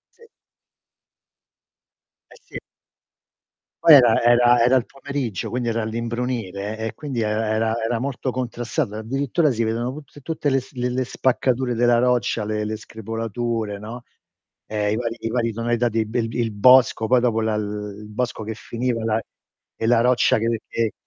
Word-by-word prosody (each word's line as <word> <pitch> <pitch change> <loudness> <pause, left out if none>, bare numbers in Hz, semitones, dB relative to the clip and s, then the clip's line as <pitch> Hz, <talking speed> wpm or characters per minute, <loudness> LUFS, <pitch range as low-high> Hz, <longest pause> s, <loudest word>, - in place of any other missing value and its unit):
Sì. 460 -1 -20 2.0
Eh - - -17
sì. - - -8 1.2
Poi 160 - +9
era 120 -5 +6
era 120 0 +5
era 125 +2 +4
il 125 - +2
pomeriggio, 135 -7 -4
quindi 120 -1 -2
era 115 0 -1
all'imbrunire 115 -3 -3
e 110 0 -4
quindi 135 -6 -4
era 110 +1 0
era 110 0 +1
era 115 +1 0
molto 135 +1 -3
contrastato, 120 -4 -3
addirittura 135 +7 0
si 115 -2 0
vedono 115 +3 -1
tut 145 -1 -12
tutte 155 0 -2
le 135 0 +2
s 130 +2 -16
le 125 0 -1
le 130 +1 -1
spaccature 130 0 0
della 120 +1 +3
roccia, 120 -3 +1
le 105 0 -2
le 110 +1 -3
screpolature, 115 0 -4
no, 115 +4 -8 0.6
ehm, 105 -1 -1
i - - 0
vari 115 0 -3
i 115 - -2
vari 115 -1 0
tonalità 120 +1 0
di 115 -1 0
bel 115 +1 -1
il 115 -2 -1
bosco, 125 +1 +5
poi 125 +2 +4
dopo 120 -2 +1
la 110 -1 0
l 105 - -1 0.3
l - - -11
il 105 - -10
bosco 120 +1 -3
che 110 - -4
finiva 120 +1 -3
la 110 0 +1 0.6
e 110 - -2
la 115 0 +4
roccia 125 -2 +3
che 115 0 -1
che 115 -2 -1
115 Hz, 170 wpm, -22 LUFS, 110-125 Hz, 2.0 s, Poi